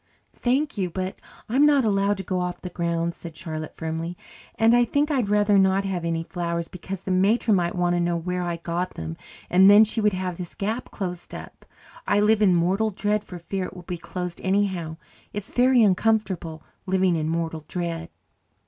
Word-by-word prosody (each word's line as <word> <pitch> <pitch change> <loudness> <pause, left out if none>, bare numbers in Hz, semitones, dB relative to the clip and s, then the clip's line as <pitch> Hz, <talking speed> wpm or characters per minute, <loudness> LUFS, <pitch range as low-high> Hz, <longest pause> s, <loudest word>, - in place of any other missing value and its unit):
"Thank 260 0 0
you, 185 -2 0
but 185 +2 -4 0.3
I 230 - -3
am 280 - +5
not 285 -4 +4
allowed 200 -1 +2
to 195 - -5
go 185 0 -2
off 180 0 -3
the 180 - -5
grounds," 170 0 -1
said 165 -2 -10
Charlotte 155 -1 -6
firmly, 165 +2 -4 0.4
"and 225 +1 +4
I 240 - +5
think 285 +6 +1
I'd 250 -8 +1
rather 205 -1 +4
not 190 +1 +3
have 185 -3 -2
any 165 -1 -1
flowers 170 -1 -3
because 185 +1 -7
the 190 - -3
matron 200 +4 +3
might 175 -1 0
want 175 0 +1
to - - +1
know 175 0 +1
where 180 +2 -2
I 175 -1 -2
got 170 +2 -3
them, 80 0 -5 0.3
and 190 +2 +6
then 205 +2 +9
she 220 +1 -1
would 210 -1 +3
have 185 -2 -3
this 175 -2 -7
gap 220 +5 -3
closed 180 -3 -6
up. - - -11 0.4
I 205 - +3
live 215 +1 +3
in 190 -4 +5
mortal 190 +6 +2
dread 205 +1 -1
for 180 -4 -9
fear 185 +2 -4
it - - -9
will 180 - -10
be 175 -1 -5
closed 180 0 -6
anyhow. 190 -5 0 0.4
It's 205 -1 -5
very 250 -1 +4
uncomfortable 190 -5 +1 0.2
living 185 -1 +2
in 155 -1 -1
mortal 165 -1 -2
dread." 170 -2 -4
185 Hz, 200 wpm, -24 LUFS, 170-205 Hz, 0.4 s, then